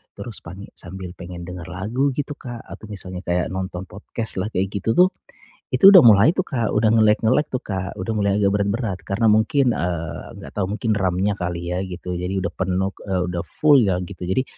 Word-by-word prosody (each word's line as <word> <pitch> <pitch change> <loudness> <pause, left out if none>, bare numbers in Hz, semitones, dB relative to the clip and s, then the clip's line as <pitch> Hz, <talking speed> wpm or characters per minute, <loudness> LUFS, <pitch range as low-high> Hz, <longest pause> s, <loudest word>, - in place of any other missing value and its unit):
terus 100 +1 -6
pani 95 +4 -9
sambil 90 0 -9
pengen 85 0 -8
denger 90 -1 -7
lagu 120 +10 -1
gitu 145 +2 -4
Kak, 120 -4 -8
atau - - -10
misalnya 90 -2 -7
kayak 90 0 0
nonton 95 -1 -5
podcast 110 +2 -6
lah 105 +4 -2
kayak 95 +1 0
gitu 100 +3 0
tuh, 180 +1 +6 0.6
itu 195 - +7
udah 185 - +11
mulai 110 +7 +7
tuh 185 - +1
Kak, 120 -7 -1
udah 110 +1 +3
nge-lag-nge-lag 110 +6 +3
tuh 130 - -1
Kak. 95 -1 -3
Udah 95 +5 -2
mulai 100 -1 +1
agak 100 -1 +3
berat-berat 100 -1 -1
karena 110 +3 +1
mungkin, 120 +5 +3
eee, 85 -2 -3 0.2
nggak - - -10
tahu 95 - 0
mungkin 110 +1 0
RAM-nya 95 +1 +1
kali 85 -1 -3
ya 90 - -1
gitu, 90 -1 -5
jadi 90 +2 -2
udah 85 -1 -3
penuh, 95 +1 -1 0.2
eee, 95 -1 0
udah 90 -1 -3
full 145 - +4
ya 95 -5 +2
gitu. 90 -1 -8
Jadi 95 +9 0
100 Hz, 200 wpm, -22 LUFS, 90-115 Hz, 0.6 s, udah